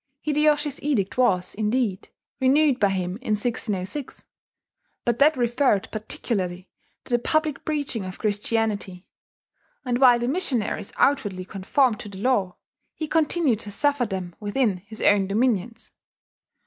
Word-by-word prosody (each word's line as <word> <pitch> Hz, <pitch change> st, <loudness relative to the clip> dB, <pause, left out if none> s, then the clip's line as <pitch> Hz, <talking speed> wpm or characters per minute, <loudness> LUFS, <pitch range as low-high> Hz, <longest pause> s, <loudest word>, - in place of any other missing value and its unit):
Hideyoshi's 300 Hz, -1 st, +1 dB
edict 240 Hz, -10 st, 0 dB
was, 190 Hz, -8 st, +2 dB
indeed, 215 Hz, -2 st, -1 dB, 0.3 s
renewed 275 Hz, 0 st, +3 dB
by 200 Hz, -, +4 dB
him 185 Hz, -1 st, -2 dB
in 235 Hz, -3 st, -2 dB
1606; 215 Hz, +2 st, -3 dB, 0.8 s
but 240 Hz, -1 st, 0 dB
that 295 Hz, +1 st, +5 dB
referred 240 Hz, -3 st, +1 dB
particularly 190 Hz, -4 st, -3 dB, 0.4 s
to 245 Hz, -, -6 dB
the 240 Hz, -, +4 dB
public 310 Hz, 0 st, 0 dB
preaching 285 Hz, -8 st, -2 dB
of 185 Hz, 0 st, -7 dB
Christianity; 205 Hz, -3 st, -2 dB, 0.8 s
and 245 Hz, -1 st, 0 dB
while 250 Hz, -2 st, +7 dB
the 240 Hz, 0 st, -2 dB
missionaries 250 Hz, -, -1 dB
outwardly 205 Hz, -10 st, +1 dB
conformed 215 Hz, +5 st, +1 dB
to 210 Hz, -, -8 dB
the 195 Hz, -, -10 dB
law, 200 Hz, -5 st, 0 dB, 0.4 s
he 310 Hz, -, -4 dB
continued 310 Hz, -6 st, +1 dB
to 210 Hz, -, -4 dB
suffer 280 Hz, +2 st, +1 dB
them 185 Hz, -3 st, -5 dB
within 210 Hz, -1 st, 0 dB
his 210 Hz, +4 st, -10 dB
own 200 Hz, -2 st, +4 dB
dominions. 225 Hz, +1 st, -1 dB
230 Hz, 135 wpm, -24 LUFS, 200-270 Hz, 0.8 s, while